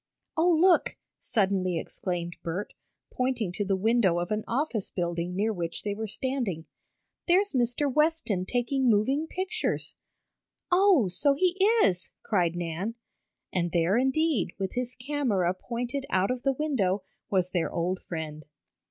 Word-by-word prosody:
"Oh, 340 +2 +4
look!" 360 0 +4 0.2
suddenly 190 -5 +1
exclaimed 175 0 -3
Bert, 180 +5 -4 0.4
pointing 250 -7 -1
to 205 - -2
the 195 -1 +1
window 205 -3 +3
of 175 +2 -2
an 215 0 0
office 240 -5 -1
building 175 0 -2
near 215 +3 +1
which 170 -3 -4
they 205 - -1
were 220 +2 -4
standing. 220 - -2 0.6
"There's 385 +2 +3
Mr. 245 +2 +1
Westen 295 - +1
taking 250 +1 +1
moving 265 +9 +2
pictures!" 370 +3 -2 0.8
"Oh, 360 - +5
so 275 +10 +4
he 360 +4 +2 0.3
is!" 180 0 0
cried 175 -6 +1
Nan. 175 +6 -3 0.6
And 175 -2 0
there 170 +3 +3
indeed, 265 +3 +1
with 190 -1 -3
his 250 0 -3
camera 245 -10 0
pointed 245 +7 -4
out 190 +4 +2
of 255 -1 -3
the 275 +1 +1
window, 220 -10 0 0.3
was 185 -2 +1
their 175 -3 0
old 180 +2 -1
friend. 155 -2 -6
215 Hz, 145 wpm, -28 LUFS, 180-270 Hz, 0.8 s, Oh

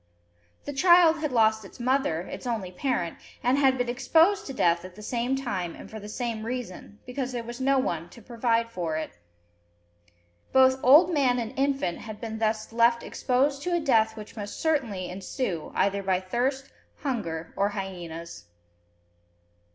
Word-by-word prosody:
The 290 - -4
child 340 +1 +6
had 305 -2 -2
lost 220 -2 +3
its 195 - -13
mother, 250 -10 +1
its 220 - -7
only 215 -7 -2
parent, 185 -5 -2 0.2
and 250 +2 +3
had 265 -2 +4
been 245 -1 -1
"exposed" 320 +12 +3
to - - -4
death 170 -7 +2
at 185 -1 -10
the 210 - -11
same 240 +4 -1
time 195 -10 -3
and - - -12
for 220 - -7
the 210 0 -9
same 230 -1 -3
reason, 225 -4 -6
because 250 0 -4
there 240 -1 -3
was 240 +2 -7
no 270 +1 +3
one 170 -10 -1
to - - -14
provide 230 0 0
for 170 -6 -3
it. 155 - -4 1.4
Both 260 0 +5
old 320 +7 +7
man 260 -5 +3
and 235 0 -3
infant 275 -9 0
had 215 -1 -8
been 220 -1 -5
thus 220 0 -1
left 235 0 +3
exposed 275 +2 0
to 350 +3 0
a - - +2
death 225 -7 +2
which 215 0 -9
must 205 -2 -6
certainly 235 - 0
ensue, 185 - -4
either 200 0 +1
by 190 -1 +1
thirst, 260 +8 -2 0.3
hunger, 170 - -3
or 200 +1 +1
hyenas. 170 - -7
235 Hz, 170 wpm, -27 LUFS, 195-265 Hz, 1.4 s, old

